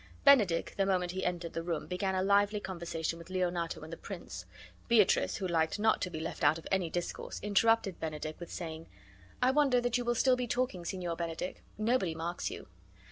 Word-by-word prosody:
Benedick, 210 Hz, -12 st, +5 dB
the 195 Hz, -, +3 dB
moment 180 Hz, -2 st, +1 dB
he 185 Hz, +1 st, -3 dB
entered 175 Hz, -2 st, -2 dB
the 165 Hz, -, -2 dB
room, 165 Hz, -1 st, -2 dB
began 190 Hz, +1 st, -1 dB
a 185 Hz, -, +1 dB
lively 205 Hz, +1 st, +3 dB
conversation 170 Hz, -4 st, -4 dB
with 170 Hz, -, -12 dB
Leonato 180 Hz, -2 st, -1 dB
and 160 Hz, +1 st, -8 dB
the -, -, -6 dB
prince. 170 Hz, -, -7 dB, 0.4 s
Beatrice, 220 Hz, -5 st, +4 dB
who 190 Hz, -, -2 dB
liked 165 Hz, -1 st, +1 dB
not 220 Hz, +1 st, +3 dB
to 185 Hz, -, -1 dB
be 160 Hz, -3 st, -5 dB
left 160 Hz, -, -5 dB
out 145 Hz, +2 st, +5 dB
of 165 Hz, -, -11 dB
any 190 Hz, -3 st, +1 dB
discourse, 175 Hz, +1 st, -4 dB
interrupted 210 Hz, -1 st, +3 dB
Benedick 155 Hz, -1 st, -4 dB
with 175 Hz, -, -8 dB
saying: 165 Hz, -2 st, -6 dB, 0.6 s
"I 255 Hz, -, +5 dB
wonder 275 Hz, -3 st, +4 dB
that 245 Hz, 0 st, +1 dB
you -, -, -2 dB
will 240 Hz, 0 st, +1 dB
still 255 Hz, +2 st, +4 dB
be 250 Hz, -1 st, -2 dB
talking, 235 Hz, -8 st, -1 dB
Signor 175 Hz, -1 st, -3 dB
Benedick. 170 Hz, +1 st, -4 dB, 0.2 s
Nobody 215 Hz, -6 st, +1 dB
marks 170 Hz, +2 st, -3 dB
you." -, -, -8 dB
180 Hz, 200 wpm, -32 LUFS, 165-210 Hz, 0.6 s, Benedick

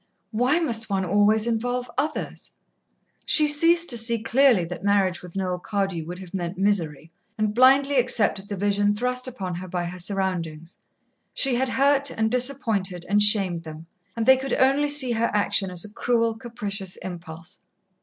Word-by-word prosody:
Why 250 Hz, +7 st, +1 dB
must 225 Hz, -9 st, -2 dB
one 190 Hz, -1 st, -1 dB
always 205 Hz, +4 st, +2 dB
involve 245 Hz, +2 st, -2 dB
others? 305 Hz, +1 st, -4 dB, 0.7 s
She 305 Hz, -1 st, +4 dB
ceased 335 Hz, +3 st, +3 dB
to 235 Hz, -, +5 dB
see 230 Hz, +1 st, +3 dB
clearly 230 Hz, -3 st, +2 dB
that 180 Hz, +2 st, -8 dB
marriage 195 Hz, -4 st, +1 dB
with 180 Hz, 0 st, -13 dB
Noel 185 Hz, -2 st, -3 dB
Cardew 195 Hz, -4 st, -3 dB
would 175 Hz, +1 st, -7 dB
have 185 Hz, -1 st, -12 dB
meant 175 Hz, -1 st, -4 dB
misery, 170 Hz, -6 st, -1 dB, 0.3 s
and 215 Hz, -1 st, -1 dB
blindly 270 Hz, +3 st, +4 dB
accepted 210 Hz, -5 st, +1 dB
the 200 Hz, -, -4 dB
vision 205 Hz, +1 st, 0 dB
thrust 250 Hz, +3 st, -1 dB
upon 195 Hz, -8 st, -6 dB
her 180 Hz, +2 st, -7 dB
by 175 Hz, -1 st, -3 dB
her 180 Hz, +1 st, -7 dB
surroundings. 175 Hz, -4 st, -3 dB, 0.6 s
She 270 Hz, -2 st, +1 dB
had 255 Hz, +2 st, 0 dB
hurt 280 Hz, +1 st, +2 dB
and 220 Hz, -2 st, -2 dB
disappointed 225 Hz, -9 st, 0 dB
and 205 Hz, +2 st, +2 dB
shamed 195 Hz, -5 st, +2 dB
them, 160 Hz, 0 st, -11 dB, 0.3 s
and 225 Hz, -, -1 dB
they 265 Hz, +1 st, +6 dB
could 265 Hz, 0 st, -4 dB
only 275 Hz, +3 st, +2 dB
see 285 Hz, -4 st, +4 dB
her 230 Hz, 0 st, 0 dB
action 200 Hz, -1 st, +1 dB
as 180 Hz, 0 st, -3 dB
a 210 Hz, -, -13 dB
cruel, 230 Hz, -1 st, 0 dB
capricious 205 Hz, -5 st, -6 dB
impulse. 170 Hz, -1 st, -10 dB
210 Hz, 170 wpm, -23 LUFS, 185-250 Hz, 0.7 s, they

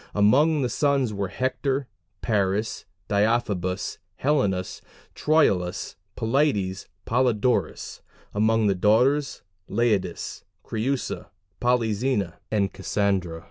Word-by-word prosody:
Among 140 Hz, +9 st, +4 dB
the -, -, +1 dB
sons 140 Hz, -6 st, +1 dB
were 100 Hz, -1 st, -2 dB
Hector, 130 Hz, +5 st, -1 dB, 0.4 s
Paris, 105 Hz, -1 st, 0 dB, 0.2 s
Deiphobus, 100 Hz, -3 st, 0 dB, 0.2 s
Helenus, 105 Hz, -11 st, 0 dB, 0.3 s
Troilus, 100 Hz, -, +1 dB, 0.2 s
Polites, 110 Hz, -6 st, 0 dB, 0.2 s
Polydorus; 120 Hz, -5 st, 0 dB, 0.3 s
among 110 Hz, +1 st, +2 dB
the 100 Hz, -, +3 dB
daughters, 125 Hz, +9 st, +2 dB, 0.3 s
Laodice, 105 Hz, -6 st, -1 dB, 0.2 s
Creusa, 125 Hz, +4 st, -2 dB, 0.3 s
Polyxena, 115 Hz, -5 st, 0 dB
and 100 Hz, -2 st, 0 dB
Cassandra. 95 Hz, -4 st, -1 dB
110 Hz, 85 wpm, -25 LUFS, 100-130 Hz, 0.4 s, Among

